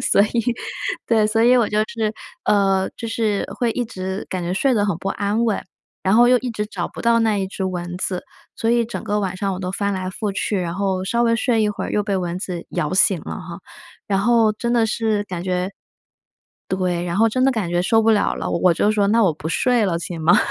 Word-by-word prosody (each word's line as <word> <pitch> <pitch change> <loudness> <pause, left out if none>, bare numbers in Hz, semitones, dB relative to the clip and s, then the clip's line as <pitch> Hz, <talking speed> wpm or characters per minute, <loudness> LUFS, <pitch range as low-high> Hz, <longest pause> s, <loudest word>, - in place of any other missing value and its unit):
所 - - +3
以 210 - +1 0.8
对， 220 -2 +3
所 225 +1 +1
以 250 +1 +6
我 235 -3 +3
就 210 - 0
是， 220 -2 -2 0.3
呃， 195 -2 +2
就 230 - -5
是 220 -3 0
会 240 -2 +1
一 245 +1 -1
直 190 -2 -5
感 185 -2 -3
觉 175 +1 -2
睡 265 +8 +2
得 205 -2 +2
很 195 -5 0
不 195 - -4
安 210 +3 0
稳。 220 -3 0 0.4
然 190 +1 +2
后 240 +2 +7
又 250 0 +5
一 250 0 -4
直 210 -2 -3
找 200 -5 -4
不 - - -9
到 235 0 +4
那 220 -2 +2
一 195 -1 -1
只 190 0 -6
蚊 180 -1 -3
子， 185 -1 -3 0.3
所 225 - 0
以 235 -1 +2
整 235 - -6
个 210 0 0
晚 190 -2 -2
上 195 0 -1
我 185 - -5
都 180 0 -3
翻 200 +1 -1
来 185 -1 -3
覆 205 +1 -3
去， 205 +1 -1
然 170 -1 -3
后 190 -1 -1
稍 235 +4 +1
微 230 -1 +3
睡 230 -1 +1
一 210 - +2
会 210 - -3
儿 - - -5
又 210 - +2
被 200 -1 -1
蚊 180 -1 -2
子 180 -3 -5
咬 150 +4 -2
醒 190 -2 +3
了 - - -6
哈。 180 -2 -8 0.5
然 195 -1 +1
后 230 +1 +4
真 235 +2 -2
的 235 -2 +3
是 220 -1 0
感 180 -3 -5
觉 185 0 -1 1.0
对， 180 -2 -1
然 175 0 -2
后 225 +2 +5
真 255 +4 0
的 270 - +5
感 220 -7 -2
觉 175 +1 0
受 225 +4 +3
不 225 0 +4
了 210 - +2
了， - - -4
我 170 - 0
我 180 - +5
就 210 - +2
说： 205 -2 +2
“那 225 +1 +4
我 175 - +3
不 155 +2 -6
睡 245 +7 +2
了， 170 -3 0
行 170 -1 -6
吗？” 170 +2 +5
200 Hz, 270 characters per minute, -21 LUFS, 185-225 Hz, 1.0 s, 后